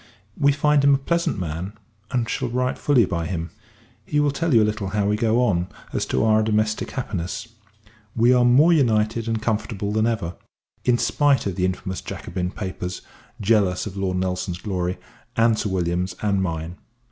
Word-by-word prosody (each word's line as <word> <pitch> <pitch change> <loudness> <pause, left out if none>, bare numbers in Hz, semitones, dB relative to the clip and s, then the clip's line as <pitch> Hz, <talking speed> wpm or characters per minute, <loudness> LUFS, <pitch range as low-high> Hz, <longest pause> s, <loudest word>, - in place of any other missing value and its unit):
We 145 0 +3
find 145 0 +2
him 140 0 +6
a - - +1
pleasant 170 +3 -1
man; 90 +2 -4 0.4
and 120 -2 0
shall 130 0 -2
write 125 +1 -1
fully 130 -7 +4
by 85 -3 -2
him. 85 -2 -4 0.5
He 150 - 0
will 145 -1 +3
tell 165 +3 -1
you 115 -4 +6
a - - +3
little 105 -2 -2
how 100 +1 0
we 105 - +2
go 115 +3 +2
on, 90 -5 +1 0.3
as - - -1
to - - +1
our 110 0 +4
domestic 110 0 0
happiness. 110 -2 -4 0.7
We 120 +2 +5
are 125 -1 +4
more 140 +8 +6
united 115 -5 +2
and 115 -1 0
comfortable 105 -2 -2
than 110 +1 +2
ever, 100 -7 -2 0.5
in 125 -1 +3
spite 145 +1 +2
of 100 -3 -2
the 90 0 +1
infamous 95 0 -3
Jacobin 90 -1 -4
papers, 90 -2 -5 0.4
jealous 100 -4 +2
of 100 -3 -7
Lord 95 -2 -1
Nelson's 90 -1 -2
glory, 90 -2 -2 0.4
and 115 -1 +3
Sir 105 - -1
William's 90 0 -1
and 100 -2 +1
mine. 85 -1 -3
105 Hz, 180 wpm, -23 LUFS, 95-120 Hz, 0.7 s, him